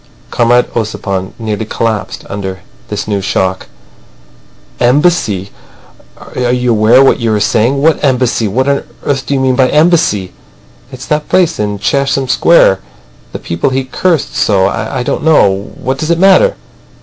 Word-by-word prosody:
Comrade 120 +1 +2
Ossipon 100 -4 -3
nearly 110 -2 -3
collapsed 110 -1 -3
under 95 -1 -6 0.3
this 105 - -5
new 100 -2 -1
shock. 95 -1 -2 1.1
"Embassy! 120 - +1 0.7
Are 125 -1 -3
you 125 -1 0
aware 115 +4 +4
what 135 - +3
you 115 -2 0
are - - 0
saying? 115 +6 +1
What 160 0 +2
Embassy? 125 -4 +1
What 130 +7 -1
on 140 0 0 0.2
earth 135 -2 -2
do 140 - 0
you - - 0
mean 130 -1 +1
by 130 0 +2
Embassy?" 155 - +1 0.6
"It's 130 -1 -9
that 150 0 -2
place 175 -3 +1
in 105 -1 -2
Chesham 135 +5 0
Square. 125 - +4 0.5
The - - -5
people 85 +9 -2
he 130 0 -1
cursed 160 +4 -1
so. 95 -3 +2
I 125 +5 -3
don't - - -3
know. 100 -11 +2
What 130 +1 -3
does 155 - -3
it 170 - +2
matter!" 195 - +4
125 Hz, 155 wpm, -12 LUFS, 105-140 Hz, 1.1 s, aware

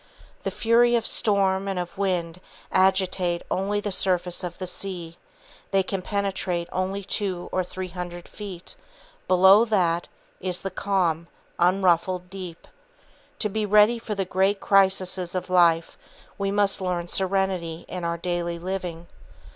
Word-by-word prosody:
The - - -2
fury 240 +1 +3
of 230 -1 0
storm 195 -2 +2
and 195 -1 -2
of 175 -1 -4
wind 180 -3 -1 0.3
agitate 185 -2 +2
only 200 +2 0
the 205 0 -3
surface 180 -2 +1
of 175 -1 -5
the 185 - -4
sea; 175 -2 -5 0.5
they 195 -1 +2
can 190 0 -3
penetrate 190 -3 -2
only 190 +2 -2
two 185 -2 -3
or 185 - 0
three 185 +1 -6
hundred 175 -1 -7
feet, 195 -4 -8 0.5
below 190 +4 +7
that 175 -6 +1 0.3
is 180 -1 -1
the 195 - -4
calm, 175 -4 0 0.3
unruffled 180 0 +2
deep. 185 -4 -8 0.7
To 215 - 0
be 215 +2 -2
ready 210 +3 +5
for 215 -2 -4
the 195 -1 -1
great 190 +2 +1
crises 190 -2 +2
of 185 0 -3
life 170 -2 +3 0.4
we 200 0 -2
must 200 0 +1
learn 180 -2 -2
serenity 185 -3 -1
in 180 -1 -5
our 170 0 -1
daily 175 0 -2
living. 175 -1 -5
185 Hz, 145 wpm, -25 LUFS, 175-195 Hz, 0.7 s, below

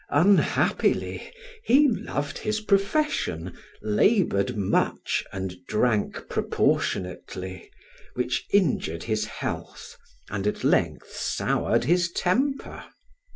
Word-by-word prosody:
Unhappily, 185 +7 +2 0.3
he 285 +5 +5
loved 145 - -2
his 215 0 -1
profession, 200 - 0 0.3
labored 110 - +2
much 100 -2 0
and 95 -1 -4
drank 110 -1 0
proportionately, 95 +1 -2 0.5
which 125 0 -1
injured 145 - +1
his 110 -1 -1
health, - - -6 0.4
and 100 0 -2
at 105 - -2
length - - +1
soured - - 0
his 170 +5 +2
temper. 265 +12 -1
125 Hz, 90 wpm, -26 LUFS, -, 0.5 s, he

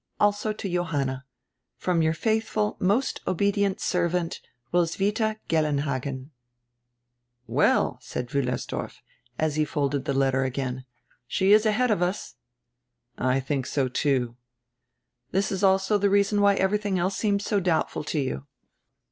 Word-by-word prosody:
Also 205 +1 +2
to 210 -1 -5
Johanna. 145 -7 -1 0.5
From 175 -2 +1
your 160 0 +2
faitjiful, 220 0 0
most 210 +9 +1
obedient 200 +1 +1
servant, 175 -1 -1 0.3
Roswitha 205 +6 +1
Gellenhagen." 140 -3 -1 1.1
"Well," 115 - +2
said 120 - -5
Wiillersdorf, 135 -3 -3 0.4
as 155 -1 0
he 155 - +3
folded 145 -2 -1
the 140 - -1
letter 135 0 +2
again, 130 -1 -3 0.4
"she 195 +8 +3
is 215 +1 +5
ahead 235 +3 +2
of 205 - +1
us." 180 +3 -2 0.9
"I 130 +1 +2
think 135 -1 -2
so, 135 -3 0
too." 125 -2 0 0.9
"This 195 +2 0
is 195 0 -2
also 190 +2 +3
the 200 0 +3
reason 200 +1 +3
why 200 0 +5
everything 200 0 +1
else 185 +2 0
seems 205 -2 0
so 205 - +1
doubtful 170 -5 0
to 155 - -1
you." 135 +1 -3
175 Hz, 130 wpm, -26 LUFS, 140-200 Hz, 1.1 s, is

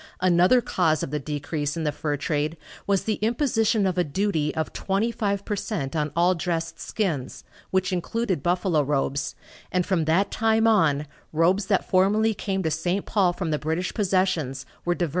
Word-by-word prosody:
Another 185 +7 +4
cause 160 -8 +1
of - - -4
the 150 - -1
decrease 145 +1 -3
in 165 - -2
the 150 - +1
fur 145 -1 -2
trade 150 +2 -1 0.3
was 200 -2 +2
the 215 -2 -1
imposition 225 -2 +2
of 185 -1 0
a - - +4
duty 155 -1 0
of 160 - -2
twenty 200 +4 0
five 200 -3 -2
per 210 - -1
cent 165 -9 -3
on 150 -1 0
all 175 +2 +4
dressed 165 -1 -3
skins, 160 - -3 0.3
which 190 0 0
included 185 - -1
buffalo 175 -1 +1
robes, 140 0 -1 0.4
and 180 -1 +1
from 175 -5 +1
that 180 +6 +2
time 225 0 +2
on 160 -10 +3 0.3
robes 180 +5 +2
that 195 -3 +1
formerly 210 +4 +3
came 195 -2 -2
to 160 - 0
St. 175 +5 -1
Paul 195 -4 +2
from 175 -2 -3
the 150 - 0
British 160 +4 -2
possessions 180 - 0 0.2
were 175 0 +1
diverted - - -15
to - - +2
Montreal. 170 - 0
180 Hz, 190 wpm, -25 LUFS, 155-200 Hz, 0.4 s, Another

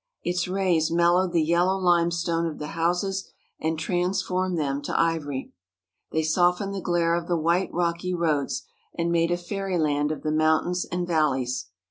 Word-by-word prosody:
Its 175 +1 -1
rays 180 -4 +1
mel 170 +1 +3
lowed 185 0 +2
the 165 -2 +2
yellow 175 +4 +2
limestone 170 -2 +1
of 160 - -5
the 150 0 -6
houses 180 +3 -1 0.3
and 160 0 -1
transformed 180 +2 -1
them 140 -2 -1
to 145 - -2
ivory. 150 -5 -1 0.6
They 160 - 0
softened 180 +4 +2
the 195 - -4
glare 170 -1 +1
of 170 0 -1
the 175 - +1
white, 170 +4 +1
rocky 175 +1 -1
roads, 155 -5 0 0.3
and 170 0 0
made 170 0 +2
a 175 - +1
fairyland 175 -6 -1
of 155 - -5
the 155 - 0
mountains 155 +3 +2
and 175 0 -3
valleys. 135 - 0
170 Hz, 165 wpm, -25 LUFS, 160-180 Hz, 0.6 s, mel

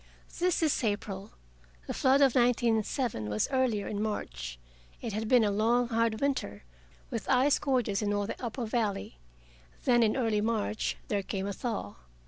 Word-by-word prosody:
This 355 -1 +2
is 305 -4 +1
April. 205 -2 -2 0.6
The - - -4
flood 270 +2 +3
of 270 -3 +5
1907 235 - +1
was 105 +1 0
earlier, 255 -6 +1
in 205 -1 -3
March. - - -4 0.4
It 225 - -5
had 215 +1 -2
been 245 -1 +5
a 205 - +2
long 235 +4 +2
hard 230 -1 +1
winter, 265 - -1 0.5
with - - -4
ice 265 +2 +4
gorges 245 -8 0
in 205 -1 0
all 205 0 0
the 225 - -6
upper 235 +1 -3
valley. 210 - -2 0.7
Then, 240 -2 +5
in 225 +2 +3
early 225 -5 +1
March, 215 -1 -1
there 205 -1 0
came 195 0 -3
a 200 - -2
thaw. 205 - -4
220 Hz, 165 wpm, -30 LUFS, 205-245 Hz, 0.7 s, of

